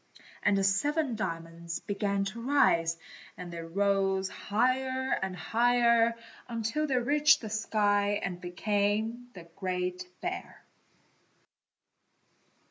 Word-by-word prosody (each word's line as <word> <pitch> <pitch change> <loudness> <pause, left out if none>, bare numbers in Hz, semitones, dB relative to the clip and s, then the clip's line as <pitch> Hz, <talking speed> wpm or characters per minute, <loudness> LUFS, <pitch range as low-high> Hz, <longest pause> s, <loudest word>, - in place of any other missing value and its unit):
And 200 - +3
the 195 - +1
seven 265 +8 +1
diamonds 170 -3 -4
began 200 -1 -1
to 215 +4 -5
rise, 170 -11 +3 0.4
and 175 -1 -8
they 170 - -5
rose 195 +2 +1
higher 260 +4 0
and 190 -1 -3
higher 235 +4 +3 0.5
till 305 +8 0
they 265 -3 +1
reached 290 +5 +4
the 215 -3 -6
sky 205 -1 +1
and 180 -1 -4
became 205 +6 -1
the 180 - -9
Great 180 -1 -3
Bear. 360 +1 -5
205 Hz, 110 wpm, -30 LUFS, 185-240 Hz, 0.5 s, reached